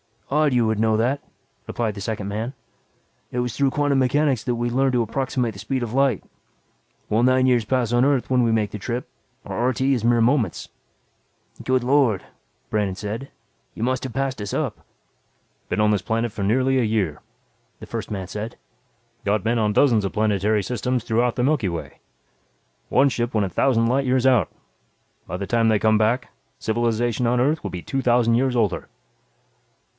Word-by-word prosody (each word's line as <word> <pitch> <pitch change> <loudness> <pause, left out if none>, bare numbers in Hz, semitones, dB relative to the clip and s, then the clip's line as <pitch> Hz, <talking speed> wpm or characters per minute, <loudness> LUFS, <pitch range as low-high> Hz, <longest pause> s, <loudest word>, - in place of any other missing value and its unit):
"Odd 150 -1 +3
you 120 -2 +3
would 110 -1 0
know 110 0 +3
that," 130 +5 0 0.5
replied 115 -3 -2
the 100 - -8
second 105 -1 -3
man. 110 +5 -3 0.8
"It 125 - -2
was 125 -2 -2
through 140 -1 +2
quantum 145 -1 +1
mechanics 135 -1 +2
that 125 -1 0
we 120 +1 -1
learned 130 +2 +1
to 125 - +3
approximate 125 0 -1
the 100 - -11
speed 125 +5 -2
of 115 -1 -5
light. 135 -5 +2 0.8
While 110 +2 +1
nine 130 +1 +4
years 120 -4 +3
pass 125 -1 0
on 120 +1 +3
Earth 140 -3 +1
when 130 -1 +3
we 115 -1 +2
make 110 -2 +1
the 105 - -6
trip, 120 +4 -4 0.4
our 120 +2 -1
RT 130 0 -1
is 130 -4 +1
mere 120 0 +4
moments." 115 - +1 0.9
"Good 130 -1 +1
Lord!" 130 -6 +2 0.5
Brandon 105 -3 0
said. 110 +7 -5 0.5
"You - - -4
must 130 +1 0
have 130 - -6
passed 135 -3 -2
us 100 - -5
up." - - -3 0.8
"Been - - 0
on 105 0 +4
this 105 -3 +1
planet 115 +4 -1
for 105 -1 -4
nearly 130 +6 +2
a - - +2
year," 105 -9 0 0.6
the - - -7
first - - -5
man 95 -3 -4
said. 105 +4 -6 0.7
"Got 105 +1 0
men 115 +1 +1
on 105 -1 +1
dozens 115 -5 +3
of 95 - -3
planetary 105 0 +1
systems 125 +3 -2
throughout 120 +1 +1
the 125 - 0
Milky 130 -8 +1
Way. 85 -1 -6 0.9
One 140 +1 +4
ship 120 -1 -2
went 105 -3 +2
a - - -3
thousand 115 +4 +2
light 135 +3 +1
years 130 0 +1
out. 125 -9 +4 0.8
By 90 - -4
the 100 - -4
time 115 +2 +2
they 110 -1 +4
come 110 +1 +3
back, 115 +4 +1 0.3
civilization 120 +1 0
on 120 +1 +2
Earth 150 +5 +1
will - - -4
be 90 - -6
two 135 - -2
thousand 120 -2 +3
years 130 +1 +1
older." 110 -6 0
120 Hz, 190 wpm, -23 LUFS, 110-130 Hz, 0.9 s, nine